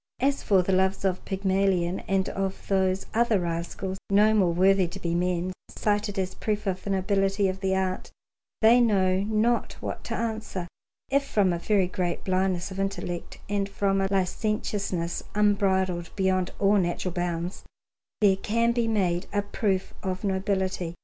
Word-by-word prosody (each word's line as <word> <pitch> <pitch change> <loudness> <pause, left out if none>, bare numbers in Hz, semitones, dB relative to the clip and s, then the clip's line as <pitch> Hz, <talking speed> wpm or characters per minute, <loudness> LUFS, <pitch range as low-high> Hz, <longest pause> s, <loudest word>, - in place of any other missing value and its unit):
As 275 +2 +1
for 190 -3 +3
the 190 - 0
loves 190 +1 +1
of 185 -1 0
Pygmalion 190 -2 +1
and 195 -1 +1
of 195 0 -4
those 190 -1 +1
other 230 -2 +3
rascals 175 +2 -3
no 210 +2 +5
more 190 -5 +3
worthy 190 +1 +4
to 185 +3 -8
be 170 -2 -2
men, 180 +1 0 0.2
cited 205 -1 -1
as 185 -1 -1
proof 210 -1 -2
of 185 -2 -2
the - - -5
nobility 195 +1 +1
of 190 0 -3
the 190 -1 0
art, 185 -1 -2 0.5
they 235 +3 +7
know 190 -5 +3
not 220 +4 +1
what - - -6
to - - -3
answer, 220 -5 -3 0.4
if, 280 0 +3
from 205 -9 +2
a 170 - -2
very 195 +1 +2
great 180 -1 -2
blindness 185 -1 0
of 190 - -6
intellect 195 -3 -3
and 200 -1 -1
from 195 -1 0
a 195 - +1
licentiousness 195 -2 -1
unbridled 190 -4 +2
beyond 190 -2 +1
all 205 +1 +3
natural 175 0 -1
bounds, 175 0 -3 0.6
there 195 -2 +5
can 230 +4 +1
be 235 -1 0
made 185 -5 0
a 205 -1 0
proof 200 -2 -1
of 185 -1 -3
nobility. 190 -3 -1
190 Hz, 165 wpm, -26 LUFS, 185-205 Hz, 0.6 s, they